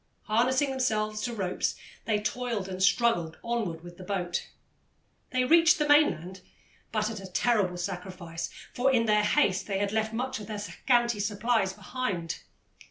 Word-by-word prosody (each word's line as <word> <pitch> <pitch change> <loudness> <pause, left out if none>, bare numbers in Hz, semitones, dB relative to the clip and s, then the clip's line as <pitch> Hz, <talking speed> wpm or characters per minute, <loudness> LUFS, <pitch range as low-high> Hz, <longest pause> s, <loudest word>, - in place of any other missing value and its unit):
Harnessing 255 +6 +2
themselves 215 -5 0
to 245 - -2
ropes, 195 -6 -1 0.3
they 215 -2 +1
toiled 220 -2 -2
and 185 0 -5
struggled 190 -5 +2
onward 215 -9 -2
with 175 0 -11
the - - -8
boat. 180 -2 -2 0.8
They 255 -2 +1
reached 330 +4 +6
the 300 - +1
mainland, 190 - +3 0.5
but 215 0 0
at 215 - -6
a 195 - -8
terrible 190 -2 +1
sacrifice, 180 -2 -5 0.2
for 260 +2 +2
in 235 -3 +3
their 210 -1 +4
haste 205 -4 +2
they 195 -2 -1
had 200 0 0
left 220 0 0
much 255 +2 -2
of 210 - -8
their 215 -1 -4
scanty 235 +2 +1
supplies 205 0 +1
behind. 195 -5 -3
215 Hz, 160 wpm, -28 LUFS, 190-245 Hz, 0.8 s, reached